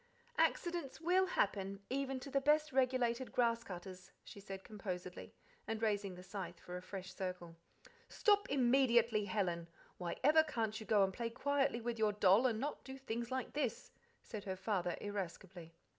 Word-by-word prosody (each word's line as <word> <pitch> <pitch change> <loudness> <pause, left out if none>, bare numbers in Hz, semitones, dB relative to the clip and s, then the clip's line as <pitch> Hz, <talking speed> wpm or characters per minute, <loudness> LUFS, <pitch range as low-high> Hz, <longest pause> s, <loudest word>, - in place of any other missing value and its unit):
"Accidents 340 -6 +1
WILL 365 +3 +3
happen, 195 - 0
even 270 0 -1
to 275 - -8
the 275 - +2
best 300 +2 +3
regulated 255 -1 +1
grass 235 -1 +2
cutters," 185 -2 -8
she - - -11
said 195 -1 -7
composedly, 185 -4 -6 0.3
and 225 -1 -2
raising 205 -4 0
the 180 - -10
scythe 185 -3 -6
for 180 - -8
a 180 - -5
fresh 190 0 -7
circle. 180 -3 -5 0.5
"Stop 410 -3 +3
immediately, 240 -5 +4
Helen! 180 -4 -1 0.3
Why 175 -2 -3
ever 305 +3 +7
can't 225 -8 -2
you 220 - -9
go 205 -2 +5
and 190 0 +1
play 230 +3 -2
quietly 275 0 +1
with 235 0 -3
your 215 -1 +3
doll, 205 +4 +5
and 225 -3 -1
not 290 +4 -3
do 265 0 -8
things 235 -3 -4
like 260 -1 -3
this?" 270 -6 -2 0.3
said 215 -3 -7
her 190 -1 -2
father 190 -3 -1
irascibly. 185 -4 -6
220 Hz, 170 wpm, -37 LUFS, 190-265 Hz, 0.5 s, ever